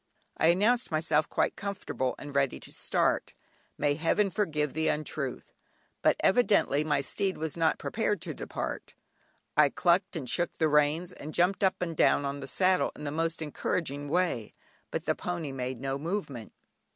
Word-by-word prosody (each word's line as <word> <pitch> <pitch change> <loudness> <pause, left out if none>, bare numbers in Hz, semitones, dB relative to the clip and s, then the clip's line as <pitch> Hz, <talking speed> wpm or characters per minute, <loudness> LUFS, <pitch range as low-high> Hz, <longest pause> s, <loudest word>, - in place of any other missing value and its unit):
I - - +3
announced 210 +8 +3
myself 155 -1 +1
quite - - +1
comfortable 200 -10 -3
and 145 -1 -8
ready 140 -2 +1
to - - -12
start; - - 0 0.4
may 145 0 +2
Heaven 175 +6 +1
forgive 150 -9 0
the 160 0 0
untruth! 150 -3 -3 0.5
But - - +4
evidently 200 - +3
my 150 -2 +1
steed 190 +7 -1
was 160 -1 -3
not 165 -1 +2
prepared 210 -3 -1
to - - -4
depart. - - -5 0.6
I 150 -1 +6
"clucked" 180 +6 +2
and 145 -6 -4
shook 175 +8 0
the 160 -2 +2
reins, 150 +4 +2
and 155 -2 -7
jumped 180 +3 +2
up 190 - +2
and 165 -2 -3
down 145 - +3
on 140 +1 -3
the 135 - -7
saddle 185 +6 +2
in - - -9
the 145 - -3
most 165 +1 -1
encouraging 145 -1 -3
way, 165 - 0 0.3
but - - -4
the - - +2
pony 170 -5 -4
made 130 -2 -4
no 135 +1 -2
movement. 150 - -4
155 Hz, 170 wpm, -29 LUFS, 145-180 Hz, 0.6 s, I